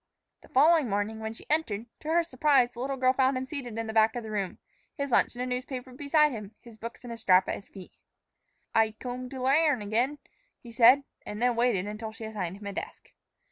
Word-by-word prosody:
The - - -18
following 305 0 +4
morning, 205 +2 -1
when 220 0 -5
she - - -12
entered, 240 -9 0
to - - -11
her 335 +2 +3
surprise, 290 -7 +3
the 240 - -12
little 270 +2 -2
girl 255 0 +3
found 265 0 +2
him 260 - -3
seated 260 -6 -6
in 225 - -2
the 220 - -5
back 220 +1 +4
of 240 - -4
the 220 - -7
room, 200 -3 -2 0.4
his 280 -3 -3
lunch - - +3
in 245 - -5
a - - -1
newspaper 255 0 -4
beside 300 +3 +3
him, 215 -3 -8
his 230 -3 -15
books 230 +2 -8
in 240 - -7
a 230 - -6
strap 185 -4 +4
at - - -1
his 200 - -9
feet. 190 -2 -12 0.8
"Ay 220 -1 +3
kome 250 0 -5
tow 260 -1 -6
lairn 280 -3 +3
again," 240 +8 0 0.4
he 240 - -13
said, 255 +4 +6 0.2
and 210 - -6
then 245 0 +2
waited 230 -5 +1
until 215 +1 -5
she 225 0 -9
assigned 195 -4 -4
him 205 - -11
a 200 - -4
desk. - - -7
240 Hz, 230 wpm, -28 LUFS, 220-265 Hz, 0.8 s, said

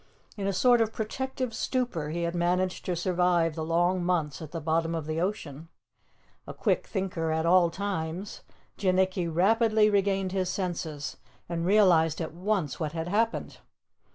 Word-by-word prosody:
In 195 -2 -3
a - - +2
sort 240 +5 +4
of 220 -1 +1
protective 255 +2 -3
stupor 225 - -2
he 170 +2 -2
had 170 0 -1
managed 180 +1 0
to 180 - -1
survive 175 -2 +1
the 160 0 -4
long 175 +3 +1
months 165 -6 -1
at 155 - -7
the 165 - -4
bottom 165 +2 0
of 160 -2 -3
the 155 +1 -2
ocean. 165 -6 -4 0.8
A - - -7
quick - - 0
thinker 185 -5 -2
at 160 +1 0
all 175 0 +5
times, 190 0 -4 0.4
Jinnicky 185 -2 +1
rapidly 215 +4 +3
regained 195 -2 +1
his 185 -1 -1
senses 165 -6 -4 0.3
and 170 0 -2
realized 175 -6 +4
at 160 -2 -4
once 180 -4 -1
what 155 -1 -2
had 165 +1 -3
happened. 225 +4 -1
180 Hz, 160 wpm, -28 LUFS, 165-200 Hz, 0.8 s, all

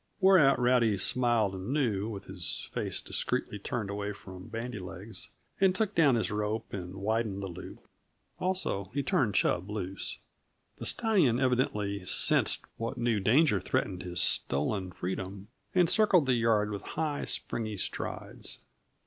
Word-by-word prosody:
Whereat 185 -8 +6
Rowdy 120 -4 +3
smiled 115 -1 +2
anew, 110 0 -1
with 100 -3 -7
his 95 -3 -2
face - - -2
discreetly 105 - -2
turned 100 0 -3
away 100 +1 -3
from 95 -2 -11
Bandy 115 -1 -5
legs, 95 +4 -6 0.3
and 190 -1 +4
took 215 +1 0
down 150 -8 +4
his 115 - 0
rope 105 +1 -2
and 90 -1 -6
widened 105 0 -1
the - - -3
loop. 85 - -10 0.5
Also, 180 - -1
he 140 - 0
turned 130 - +1
Chub 90 +1 +1
loose. 95 -3 -4 0.6
The - - -3
stallion 185 - +2
evidently 105 -7 0
sensed 90 - +4
what 115 0 -4
new 115 -3 +1
danger 110 +2 +4
threatened 90 0 -2
his 90 -1 -4
stolen 90 +7 0
freedom, 95 +2 -5 0.3
and 180 -2 +5
circled 190 -5 +4
the 130 - +2
yard 115 -3 +2
with 100 - -4 0.2
high, 150 -2 -1
springy 110 -3 -1
strides. - - -5
110 Hz, 145 wpm, -30 LUFS, 95-130 Hz, 0.6 s, Whereat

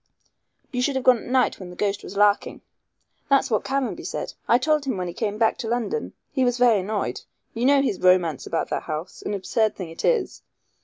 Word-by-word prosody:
"You 250 - -1
should 270 +2 0
have 265 - -1
gone 250 -2 +5
at - - -10
night 255 0 +2
when 185 -2 -8
the 180 - -10
ghost 200 +1 -1
was 200 - -8
larking." 205 0 +2 0.7
"That's 275 -3 +3
what 215 - +1
Caranby 270 -1 -2
said. - - -4
I 235 - +5
told 300 +3 +1
him 260 -7 -1
when 180 -1 -3
he 175 - -5
came 210 0 -2
back 225 0 +2
to 230 - -4
London. 245 - -2 0.2
He 265 - +1
was 245 -1 +1
very 240 -4 +5
annoyed. 205 +2 -3 0.3
You 230 +2 -1
know 275 0 +5
his 205 -8 -1
romance 180 -4 +3
about 165 - -2
that - - -1
house 155 +3 -5
an 205 - -3
absurd 215 +3 0
thing 180 -4 -7
it 165 - -8
is. 470 -6 +1
225 Hz, 220 wpm, -24 LUFS, 195-255 Hz, 0.7 s, gone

